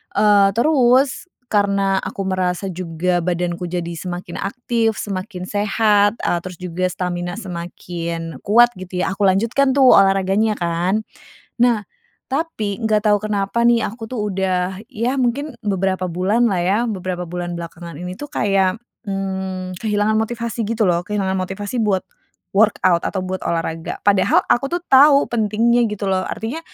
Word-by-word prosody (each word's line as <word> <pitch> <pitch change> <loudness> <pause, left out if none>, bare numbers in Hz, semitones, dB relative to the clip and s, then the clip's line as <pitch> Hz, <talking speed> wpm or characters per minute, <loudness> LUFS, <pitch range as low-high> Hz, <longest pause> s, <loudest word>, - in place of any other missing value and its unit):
eee, 205 -1 +5
terus 260 +2 +3 0.2
karena 200 -2 +2
aku 195 +1 -5
merasa 185 0 -1
juga 175 0 -1
badanku 175 0 -2
jadi 170 -1 -3
semakin 175 +1 -6
aktif, 230 +1 -1
semakin 190 -2 -5
sehat, 205 +1 +2
e - - -1
terus 185 -1 -7
juga 180 +1 -2
stamina 175 0 -3
semakin 170 -3 -6
kuat, 240 +4 +5
gitu 185 0 -4
ya - - -1
aku 200 +1 +1
lanjutkan 230 +8 +2
tuh 265 -2 +6
olahraganya, 195 +2 +2
kan. 175 +5 0 0.6
Nah, 235 -3 +3 0.5
tapi 270 -9 -2
nggak 215 -1 +2
tahu 210 0 +5
kenapa 210 +2 0
nih, 235 -1 +4
aku 225 +2 -9
tuh 255 - -4
udah 185 0 -1
ya 245 +3 -1
mungkin 260 +3 -1
beberapa 190 -2 0
bulanlah 195 +3 +1
ya, 190 +4 +2
beberapa 185 -5 -3
bulan 175 0 -4
belakangan 170 -1 -8
ini 180 +1 -6
tuh 290 - -6
kayak, 195 0 +1 0.3
hmm, 190 -1 -3
kehilangan 210 0 +1
motivasi, 230 0 -3
gitu 225 0 0
loh. 175 -1 +2
Kehilangan 195 -2 -1
motivasi 195 +5 -4
buat 195 -3 +1 0.5
workout 195 -5 +3
atau 190 -2 -3
buat 185 0 -3
olahraga. 165 -1 -3
Padahal 200 -2 +3
aku 245 +3 +3
tuh 345 +1 -1
tahu 280 +1 +7
pentingnya, 235 +1 +2
gitu 210 0 -5
loh. 190 -1 +1
Artinya 235 +9 -4
195 Hz, 145 wpm, -20 LUFS, 180-225 Hz, 0.6 s, tahu